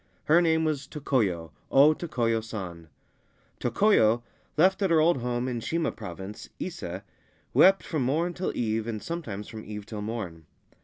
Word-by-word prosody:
Her 165 +3 +5
name 160 -1 +2
was 150 -3 -1
Tokoyo, 105 - -1 0.2
O 145 +3 +6
Tokoyo 120 -9 -1
San. 90 -7 -7 0.7
Tokoyo, 120 - +3 0.3
left 190 +5 +4
at 195 - +2
her 165 -1 +5
old 165 0 +4
home 120 0 -2
in 120 -2 -2
Shima 165 +8 -1
Province, 100 -1 -8
Ise, 100 - -5 0.5
wept 195 +1 +6
from 155 -4 -2
morn 160 +8 +1
till 180 +2 -2
eve, 110 -1 -1
and 110 -2 -3
sometimes 130 -13 -5
from 110 -1 -8
eve 105 -1 -7
till 105 -1 -6
morn. 100 -8 -5
120 Hz, 155 wpm, -27 LUFS, 105-160 Hz, 0.7 s, O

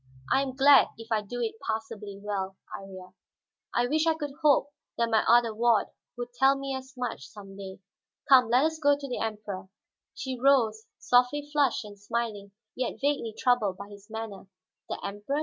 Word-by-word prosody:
I 270 - +4
am 265 -2 -3
glad 280 0 +7
if 225 0 -11
I 220 -1 +2
do 240 +4 -6
it 225 -1 -3
passably 220 -2 -4
well, 195 -2 -4 0.2
Iría. 190 -2 -10 0.6
I 240 - +1
wish 310 +5 +1
I 325 - +3
could 295 -2 -4
hope 290 -1 +4 0.3
that 235 -1 +1
my 220 - +4
other 235 -1 +5
ward 230 -1 +2 0.3
would 245 0 -6
tell 270 +2 +4
me 275 0 -4
as 265 0 -9
much, 245 - -4
some 195 -2 -12
day. 195 -1 -8 0.5
Come, 255 -4 +6
let 250 +3 +4
us 320 0 -1
go 285 -2 +4
to 285 -1 -7
the 250 - -3
Emperor." 210 -4 -5 0.5
She 260 -2 -5
rose, 235 -5 +3
softly 250 +4 +2
flushed 285 -7 +1
and 205 -1 -12
smiling, 205 -2 -3 0.2
yet 255 -1 -3
vaguely 275 -6 -1
troubled 220 -7 +2
by 200 0 -9
his 205 0 -14
manner. 220 -3 -7 0.4
"The - - -3
Emperor?" 205 +9 -3
235 Hz, 185 wpm, -28 LUFS, 205-270 Hz, 0.6 s, glad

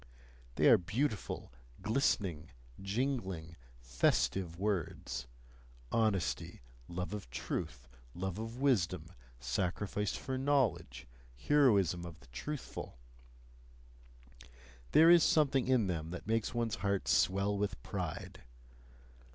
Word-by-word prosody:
They - - +4
are - - +8
beautiful, 105 - -2 0.3
glistening, 100 - 0 0.3
jingling, 95 - -2 0.2
festive 80 +8 0
words: 85 - -2 0.6
honesty, 95 - 0 0.2
love 90 +3 -4
of 100 -12 -6
truth, 60 0 -4 0.3
love 95 +2 -3
of 115 +2 -6
wisdom, 130 -11 +1 0.3
sacrifice 95 +10 -1
for 130 -1 -3
knowledge, 90 - 0 0.3
heroism 100 - +3
of 85 -2 -9
the - - -18
truthful 145 - -6 1.9
there 165 +2 +8
is 170 -2 +7
something 140 -5 +3
in 130 -4 +3
them 80 -4 -2
that 90 - -7
makes 115 0 0
one's 115 -2 -1
heart 100 0 -1
swell 100 +2 +2
with 100 -8 -2
pride. - - -5
100 Hz, 100 wpm, -34 LUFS, 85-120 Hz, 1.9 s, are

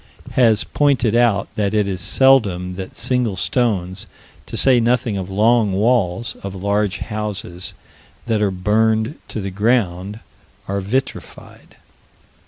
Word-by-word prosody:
_, - - -15
has 115 -4 +3
pointed 135 -6 +1
out 115 -4 +2
that 105 0 -1
it 105 -2 +2
is 95 -1 -3
seldom 100 -10 +3
that 95 0 -8
single 125 -5 0
stones, 95 -4 -1 0.4
to - - -5
say 130 -2 +5
nothing 120 -1 +1
of 95 -1 -4
long 110 +1 +2
walls, 110 0 0
of 100 -1 -6
large 100 0 -1
houses 100 -5 -5 0.5
that 110 -3 0
are 105 - +2
burned 110 +6 0
to - - -5
the 100 -1 -4
ground, 100 -2 0 0.5
are 100 0 -2
vitrified. 125 +8 -5
105 Hz, 135 wpm, -19 LUFS, 95-120 Hz, 0.5 s, say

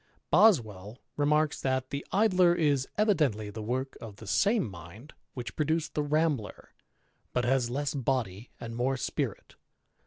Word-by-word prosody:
BoBwell 115 - +3 0.2
remarks 150 +1 +1
that 130 -1 -1
the 140 +1 -3
Idler 185 -4 +4
is 145 -6 +1
" - - -39
evidently 150 - +1
the 110 +2 -7
work 130 +5 -3
of 110 -3 -8
^ 110 +1 -12
same 205 - +2
mind 95 - -12 0.2
which 125 -2 -6
produced 160 +1 -1
the 150 - 0
Ramhler^ 145 -6 -1 0.6
but 125 -1 +1
has 125 -1 +2
less 140 +3 -2
body 125 -6 -2
and 115 -1 -7
^Ore 130 +3 0
spirit - - -3
• - - -20
135 Hz, 155 wpm, -29 LUFS, 115-155 Hz, 0.6 s, Idler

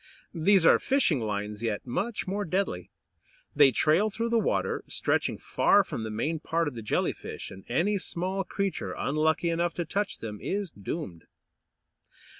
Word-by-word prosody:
These 180 +1 +4
are - - +7
fishing 260 - +2
lines, 105 -1 -3
yet 110 -3 -2
much 200 - -2
more 200 +2 -1
deadly. 165 - -2 0.7
They 145 -1 +7
trail 160 - +3
through 230 +3 -2
the 230 0 +3
water, 215 - 0
stretching - - 0
far - - +3
from - - -5
the 110 - -4
main 150 +10 -2
part 165 +1 0
of 145 - -3
the 115 - -6
Jelly 110 - 0
fish; - - -8
and 95 - -11
any 190 +11 +1
small 185 +2 -2
creature 195 +1 -3
unlucky 160 +3 +1
enough 170 +1 0
to 175 - -2
touch 200 +5 -2
them 105 -2 -6
is 200 -3 -2
doomed. 100 - -6
165 Hz, 165 wpm, -28 LUFS, -, 0.7 s, are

